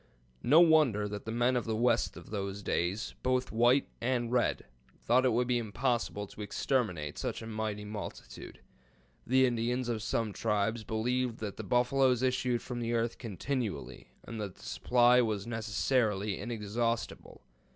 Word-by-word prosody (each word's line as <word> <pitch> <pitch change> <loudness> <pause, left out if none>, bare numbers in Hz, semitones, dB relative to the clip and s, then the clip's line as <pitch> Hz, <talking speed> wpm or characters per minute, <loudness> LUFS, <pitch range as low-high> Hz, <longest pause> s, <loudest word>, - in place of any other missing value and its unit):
No 150 +7 +6
wonder 150 -11 +4
that 105 0 -6
the 110 - -4
men 120 +2 +2
of 125 - 0
the 110 -1 -1
West 120 +1 +1
of - - -12
those 100 -1 -4
days, 95 +6 -1
both 130 0 0
white 120 +4 +4
and 120 -1 0
red, 125 -1 +1 0.3
thought 125 +3 +3
it 130 - +4
would 120 +2 +1
be 125 -1 +2
impossible 115 -2 -1
to 105 - -11
exterminate 100 - -1
such - - -3
a - - -7
mighty 110 -2 -3
multitude. 105 0 -8 0.7
The 130 +1 +5
Indians 120 +1 -1
of 115 -2 -1
some 110 0 -1
tribes 110 +1 0
believed 120 +2 -1
that 105 -3 -5
the - - -5
buffaloes 125 0 +2
issued 125 -2 0
from 125 -2 -5
the 120 0 -2
earth 115 0 -1
continually, 115 +1 -4 0.2
and 115 -2 -6
that 100 -4 -5
the - - -15
supply 125 0 +4
was 110 -4 -1
necessarily 110 -2 0
inexhaustible. 115 0 -3
115 Hz, 160 wpm, -31 LUFS, 105-125 Hz, 0.7 s, No